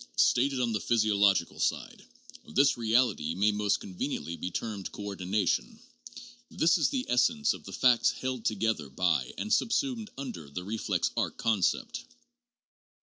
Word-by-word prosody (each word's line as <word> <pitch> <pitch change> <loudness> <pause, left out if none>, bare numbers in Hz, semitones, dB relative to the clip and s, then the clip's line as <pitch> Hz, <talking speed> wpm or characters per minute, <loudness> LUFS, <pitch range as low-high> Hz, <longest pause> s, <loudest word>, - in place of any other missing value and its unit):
Stated 135 +2 +3
on 120 -2 0
the 105 - -1
physiological 105 -5 +2
side, - - -2 0.5
this 140 0 +5
reality 115 -9 +1
may 100 +3 +3
most 105 -1 0
conveniently 95 - -4
be 90 - -4
termed 105 -1 -5
coordination. 100 - -2 0.7
This 165 +1 +2
is - - +3
the 260 -3 -2
essence 220 - +2
of - - -11
the - - -8
facts 125 -2 +4
held 130 -3 -4
together 110 -8 -1
by 75 -3 0
and 105 +2 -1
subsumed 230 -2 0
under 120 - -7
the 90 +6 -6
reflex 110 +3 -1
arc - - -1
con 110 -4 +1
cept. 235 - -1
110 Hz, 145 wpm, -29 LUFS, 95-130 Hz, 0.7 s, this